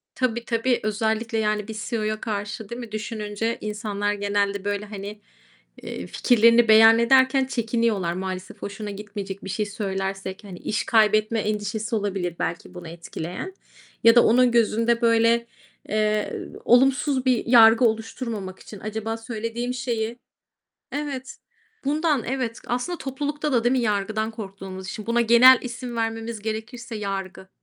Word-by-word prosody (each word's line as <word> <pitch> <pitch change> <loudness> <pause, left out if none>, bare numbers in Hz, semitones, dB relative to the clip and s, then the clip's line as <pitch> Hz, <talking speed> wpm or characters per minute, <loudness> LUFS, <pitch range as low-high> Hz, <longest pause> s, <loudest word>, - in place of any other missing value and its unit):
Tabii, 235 -2 -1
tabii. 235 +1 +1
Özellikle, 220 +1 -1
yani, 210 -1 0
bir 220 -1 -6
CEO'ya 215 -2 -2
karşı, 205 0 -4
değil 235 +1 -6
mi, 230 -3 -9
düşününce 215 +1 -3
insanlar 210 -1 -2
genelde, 200 -1 -1
böyle, 205 0 -2
hani, 205 0 -8 0.6
eee, 90 - -6
fikirlerini 235 0 +4
beyan 225 +1 +8
ederken 260 +2 +4
çekiniyorlar 225 -7 0
maalesef. 185 0 -5
"Hoşuna 205 +1 -5
gitmeyecek 200 -1 -7
bir 195 - -6
şey 210 +3 -1
söylersek" 195 -1 -4
hani, 190 -3 -10
iş 215 - -2
kaybetme 215 0 +3
endişesi 215 +1 -2
olabilir, 195 -5 -2
belki 175 +2 -4
bunu 175 -2 -9
etkileyen. 170 - -7 0.5
Ya 230 +1 +7
da 240 - +7
onun 245 +1 +4
gözünde, 230 +1 +2
böyle, 230 0 +3 0.4
eee, 215 0 0 0.2
olumsuz 260 +2 +3
bir 250 -3 +2
yargı 230 0 +7
oluşturmamak 220 -3 -3
için, 205 - -11
"Acaba 220 +1 -4
söylediğim 230 +2 -4
şeyi" 235 -2 -3 0.7
Evet, 280 -3 -5 0.5
bundan, 300 -2 +1
evet, 250 -3 -3
aslında 250 +9 -2
toplulukta 290 +2 -3
da, 235 -2 +2
değil 240 - +3
mi, 265 - +2
yargıdan 215 0 -1
korktuğumuz 195 -3 -8
için. 215 - -6
Buna 235 +1 +2
genel 235 +2 +7
isim 245 -1 -6
vermemiz 225 0 -3
gerekirse: 220 +2 -5
Yargı. 195 -2 -5
220 Hz, 140 wpm, -24 LUFS, 205-235 Hz, 0.7 s, beyan